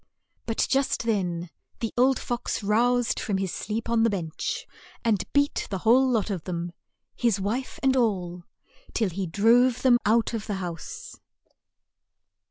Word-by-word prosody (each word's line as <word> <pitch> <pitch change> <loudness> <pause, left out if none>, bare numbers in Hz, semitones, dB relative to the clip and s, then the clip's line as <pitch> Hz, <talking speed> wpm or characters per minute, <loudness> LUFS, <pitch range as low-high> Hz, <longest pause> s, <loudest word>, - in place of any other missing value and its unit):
But 225 - +1
just 270 -3 +1
then 180 -6 -1 0.3
the 230 - -3
old 260 +2 +4
fox 240 -2 -3
roused 240 +3 +2
from 200 -3 -1
his 190 -2 -2
sleep 220 +2 -3
on 230 -1 +2
the 230 - +4
bench, 190 - -3 0.4
and 215 -5 +2
beat 285 0 +1
the 195 - -2
whole 250 +7 +4
lot 225 -4 +1
of 180 -5 -4
them, 175 -1 -3 0.4
his 235 -5 +1
wife 225 +7 -3
and 265 -1 +4
all, 185 -8 0 0.5
till 220 -5 +1
he 190 +2 -3
drove 235 +7 +3
them 245 -2 +5
out 225 +2 +2
of 220 -2 -4
the 205 - -2
house. 190 - -7
225 Hz, 155 wpm, -26 LUFS, 190-245 Hz, 0.5 s, them